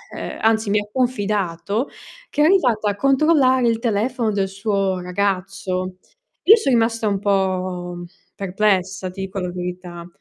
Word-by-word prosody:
ehm, - - -5
anzi 220 -1 +2
mi 210 - +3
ha 205 - -6
confidato 210 - -1 0.4
che 295 - -1
è - - +6
arrivata 250 - +3
a 200 - -2
controllare 270 0 +3
il 230 -1 +1
telefono 230 +1 0
del 195 -2 0
suo 195 -1 -1
ragazzo. 185 0 -2 0.5
Io 430 +5 +9
so' 290 -11 -1
rimasta 230 -2 +2
un 200 -2 0
po' 185 -3 -1 0.3
perplessa, 190 -1 0
ti 190 +2 -8
dico 195 +1 -4
la 180 -1 -3
verità. 180 -1 -6
200 Hz, 145 wpm, -21 LUFS, 185-230 Hz, 0.5 s, Io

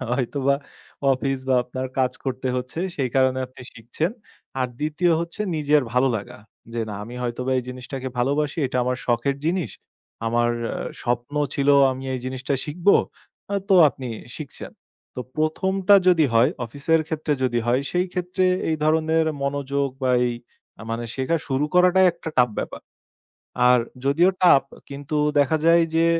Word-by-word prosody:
হয়তোবা 135 +2 0 0.6
অফিস 135 +1 -1
বা 130 - +4
আপনার 130 +1 -4
কাজ 130 -1 +2
করতে 130 -1 -2
হচ্ছে 125 +6 -4 0.2
সেই 130 -3 -1
কারণে 130 0 +3
আপনি 125 0 -14
শিখছেন। 120 +9 -3 0.5
আর 130 - +2
২য় 155 +4 +1
হচ্ছে 170 +4 -5 0.2
নিজের 150 -1 +3
ভালো 125 +2 +3
লাগা। 100 -1 -8 0.3
যে 120 - -2
"না, 105 - -5
আমি 120 - -9
হয়তোবা 125 +2 -2
এই - - -2
জিনিসটাকে 130 +1 -6
ভালোবাসি। 145 +5 0
এটা 130 0 -2
আমার 125 0 0
শখের 125 +3 +1
জিনিস। 175 +1 0 0.6
আমার 120 +1 +2 0.2
আ - - -4 0.3
স্বপ্ন 120 +3 -2 0.2
ছিল 140 0 0 0.2
আমি 130 0 -6
এই 130 - -4
জিনিসটা 130 +2 -2
শিখব।" 170 +5 -8 0.7
আ - - +1
তো 195 - +5
আপনি 130 -1 -7 0.3
শিখছেন। 150 -4 -8 0.5
তো - - -3 0.2
১ম 155 +5 0 0.2
টা 200 - +9
যদি 170 -4 +5
হয় 115 +2 +5
অফিসের 145 +7 0
ক্ষেত্রে 155 -1 -1
যদি 125 -2 +1
হয়, 120 +2 +2
সেইক্ষেত্রে 180 0 -1 0.2
এই 160 - +1
ধরনের 160 +1 +2 0.2
মনোযোগ 140 0 -1 0.2
বা 130 - +2 0.2
এই 120 - -3 0.5
আ - - -8
মানে 115 +1 -3
শেখা 135 +5 0
শুরু 135 0 0
করাটাই 180 +1 +5
একটা 170 -1 -8
tough 125 -2 +4
ব্যাপার। - - -4 0.9
আর 125 0 +6 0.3
যদিও 160 +7 +4
tough 140 -6 +6 0.2
কিন্তু 145 +2 -4 0.2
দেখা 145 +3 +3
যায় 165 0 +6
যে 165 0 +4
140 Hz, 160 wpm, -23 LUFS, 125-160 Hz, 0.9 s, টা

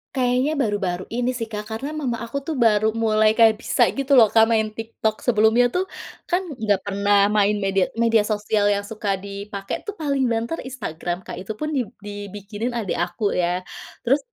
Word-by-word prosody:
Kayaknya 260 +4 +1
baru-baru 195 -6 -1
ini 245 +2 -1
sih 235 -3 -4
Kak 210 0 -6
karena 275 +8 -4
mama 250 -6 -2
aku 235 +5 -4
tuh 305 -4 -3
baru 220 -1 +4
mulai 220 -1 +3
kayak 225 -1 +5
bisa - - +3
gitu 275 0 -3
loh 225 - +7
Kak 225 +1 +5
main 220 -1 +2
TikTok. 220 -1 -3
Sebelumnya 235 +1 +4
tuh, 375 +1 -1 0.4
kan 360 +2 +1
nggak 210 -7 0
pernah 200 0 +2
main 210 0 +3
media 195 -1 +2
media 230 -2 +3
sosial 210 -1 +1
yang 205 0 +1
suka 205 -1 -2
dipakai 200 - -6
tuh 415 - -4
paling 280 -5 0
banter 230 +7 -1
Instagram 175 -7 -5
Kak - - -7
itu 195 +4 -6
pun 305 +7 -3
dib 255 -7 -2
dibikinin 205 +3 -5
adek 215 -7 -2
aku 200 +4 -1
ya. 180 +1 0 0.4
Terus 270 +5 +3
220 Hz, 180 wpm, -22 LUFS, 205-245 Hz, 0.4 s, loh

